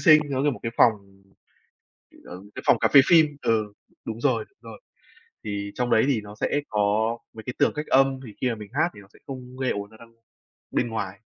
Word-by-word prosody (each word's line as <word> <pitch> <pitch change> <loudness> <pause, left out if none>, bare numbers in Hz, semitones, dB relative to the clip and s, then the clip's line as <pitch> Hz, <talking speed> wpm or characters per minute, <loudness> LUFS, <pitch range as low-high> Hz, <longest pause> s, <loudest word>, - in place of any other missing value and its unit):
xinh, 155 -4 +7
nó 135 -1 0
như 145 - +3
một 130 - -7
cái 115 0 -3
phòng, 115 - +6 1.3
ừm, 95 +3 -11
cái - - -6
phòng - - +5
cà - - +3
phê 140 - +10
phin 155 -4 +5
ừ, 110 -3 0 0.3
đúng 115 +1 -6
rồi, 115 -6 +1 0.2
rồi, 115 -3 -11 0.6
thì 100 -1 -4
trong 125 -1 -1
đấy 110 - +4
thì 125 -7 +1
nó 105 0 -11
sẽ 145 - +1
có 105 +2 +1 0.2
mấy 110 - -10
cái 125 - -5
tường - - +4
cách 150 0 -4
âm, 135 0 +3
thì 105 - -11
khi 130 - +1
mà 115 - -2
mình 105 -2 -10
hát - - +2
thì 105 - -11
nó 100 - -17
sẽ - - -20
không 130 -2 -8
gây 130 -1 0
ổn 100 0 -4
ra 110 - -17
đâu 115 0 -14 0.6
bên - - 0
ngoài. 100 -4 -4
115 Hz, 230 wpm, -25 LUFS, 105-130 Hz, 1.3 s, phê